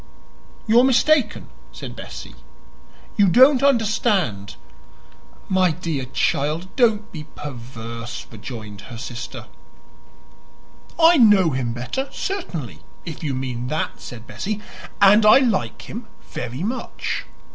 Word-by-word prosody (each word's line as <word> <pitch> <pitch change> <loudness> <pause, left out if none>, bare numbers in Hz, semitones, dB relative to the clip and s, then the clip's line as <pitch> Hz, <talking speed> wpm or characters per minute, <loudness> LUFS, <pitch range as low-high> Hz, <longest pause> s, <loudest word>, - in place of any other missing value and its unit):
"You 225 +2 +5
are - - +6
mistaken," 260 -2 +3 0.2
said - - -8
Bessie. - - -9 0.8
"You 205 -2 +5
don't 255 +7 +6
understand." 210 - +1 0.9
"My 185 -1 +3
dear 160 -5 -3
child, 155 +6 -1
don't 220 -4 +2
be 155 -3 -7
perverse," 120 -3 -7
rejoined 110 -2 -8
her 120 - -8
sister. 120 0 -7 1.5
"I 335 +1 +7
know 205 - +6
him 130 -3 -1
better, 125 - -4
certainly, 165 - -4 0.3
if 165 0 -7
you 140 -4 -1
mean 125 -2 -4
that," 155 +4 -3
said 120 -2 -9
Bessie. 205 - -4 0.4
"And 205 +2 +7
I 215 +3 +8
like 240 -8 0
him 225 +1 -8 0.2
very 125 +5 -6
much. 240 +6 -3
170 Hz, 115 wpm, -22 LUFS, -, 1.5 s, I